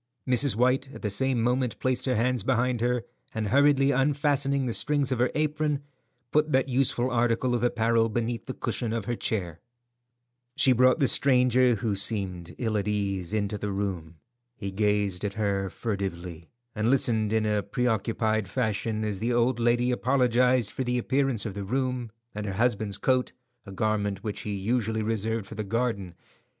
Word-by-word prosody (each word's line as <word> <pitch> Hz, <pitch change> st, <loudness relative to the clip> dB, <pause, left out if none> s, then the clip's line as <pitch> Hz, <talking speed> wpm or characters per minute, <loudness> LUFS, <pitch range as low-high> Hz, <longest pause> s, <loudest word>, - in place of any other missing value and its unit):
Mrs. 125 Hz, -1 st, +3 dB
White 130 Hz, +3 st, +2 dB
at -, -, -11 dB
the 105 Hz, -, -1 dB
same 130 Hz, +2 st, 0 dB
moment 125 Hz, 0 st, 0 dB
placed 130 Hz, -1 st, -1 dB
her 130 Hz, -, +1 dB
hands 125 Hz, +1 st, +1 dB
behind 125 Hz, +1 st, 0 dB
her, 120 Hz, 0 st, 0 dB, 0.3 s
and 110 Hz, -2 st, -2 dB
hurriedly 140 Hz, +1 st, +4 dB
unfastening 140 Hz, 0 st, +1 dB
the 120 Hz, -, -2 dB
strings 145 Hz, -1 st, +1 dB
of 130 Hz, -, 0 dB
her 125 Hz, +1 st, +3 dB
apron, 150 Hz, -1 st, 0 dB, 0.5 s
put 150 Hz, 0 st, +2 dB
that 130 Hz, -1 st, +2 dB
useful 130 Hz, -1 st, 0 dB
article 120 Hz, +1 st, +1 dB
of 120 Hz, -1 st, 0 dB
apparel 115 Hz, -1 st, +2 dB
beneath 115 Hz, +1 st, -3 dB
the 130 Hz, -, -5 dB
cushion 115 Hz, -3 st, -2 dB
of 115 Hz, -3 st, -3 dB
her 120 Hz, -, -2 dB
chair. 90 Hz, -9 st, -2 dB, 1.0 s
She 130 Hz, -, +6 dB
brought 130 Hz, +3 st, +4 dB
the 140 Hz, -, +4 dB
stranger, 125 Hz, -2 st, +4 dB
who 110 Hz, -1 st, -2 dB
seemed 95 Hz, -4 st, -1 dB
ill 110 Hz, -3 st, -1 dB
at 100 Hz, -, -4 dB
ease, 100 Hz, -4 st, -2 dB
into 105 Hz, -1 st, -1 dB
the 105 Hz, 0 st, -3 dB
room. 95 Hz, -5 st, -4 dB, 0.4 s
He 100 Hz, -3 st, -5 dB
gazed 105 Hz, -2 st, 0 dB
at 100 Hz, -1 st, -3 dB
her 100 Hz, -2 st, -1 dB
furtively, 90 Hz, -7 st, -5 dB, 0.2 s
and 110 Hz, +1 st, 0 dB
listened 115 Hz, -5 st, +2 dB
in 110 Hz, -1 st, +1 dB
a 105 Hz, -1 st, +1 dB
preoccupied 110 Hz, -1 st, -1 dB
fashion 110 Hz, -2 st, -1 dB
as 105 Hz, -3 st, -3 dB
the 115 Hz, +4 st, -1 dB
old 120 Hz, +1 st, +1 dB
lady 120 Hz, +1 st, +2 dB
apologized 125 Hz, -2 st, +2 dB
for 130 Hz, -, -3 dB
the 125 Hz, 0 st, -1 dB
appearance 130 Hz, -3 st, 0 dB
of 105 Hz, -, -4 dB
the 100 Hz, 0 st, -5 dB
room, 125 Hz, +1 st, -2 dB, 0.2 s
and 105 Hz, 0 st, -5 dB
her 100 Hz, -, -3 dB
husband's 105 Hz, -1 st, 0 dB
coat, 130 Hz, -1 st, +1 dB, 0.3 s
a -, -, -8 dB
garment 105 Hz, -1 st, -1 dB
which 105 Hz, -2 st, -4 dB
he 105 Hz, -1 st, -4 dB
usually 110 Hz, +2 st, -1 dB
reserved 110 Hz, 0 st, -2 dB
for 110 Hz, -, -10 dB
the 110 Hz, 0 st, -4 dB
garden. 105 Hz, -5 st, -2 dB
115 Hz, 175 wpm, -27 LUFS, 105-125 Hz, 1.0 s, She